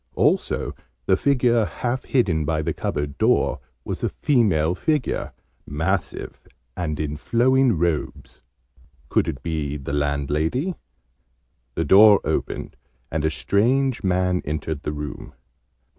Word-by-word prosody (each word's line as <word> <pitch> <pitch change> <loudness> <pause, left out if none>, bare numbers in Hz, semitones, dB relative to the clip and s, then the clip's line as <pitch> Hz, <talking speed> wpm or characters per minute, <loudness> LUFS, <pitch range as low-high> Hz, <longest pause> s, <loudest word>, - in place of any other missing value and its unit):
Also - - +1 0.3
the 95 - +4
figure 120 -1 +2
half 125 +4 -3
hidden 95 - +1
by 80 +1 -1
the - - -1
cupboard 75 -1 -3
door - - +2 0.3
was - - -4
a - - 0
female 95 - +2
figure, 150 - -1 0.4
massive, 80 +1 -3 0.3
and 75 -4 -3
in 75 -1 -2
flowing 125 - +3
robes. 85 -2 -2 0.7
Could - - +2
it 65 - -4
be 75 -3 -2
the 70 0 -6
landlady? 75 - 0 1.0
The 80 - 0
door 100 +4 +8
opened, - - -3 0.3
and 75 -1 -1
a 80 - +2
strange 115 - +1
man 90 -1 +1
entered 75 0 -3
the - - -3
room. 75 0 -7
85 Hz, 125 wpm, -23 LUFS, 75-115 Hz, 1.0 s, door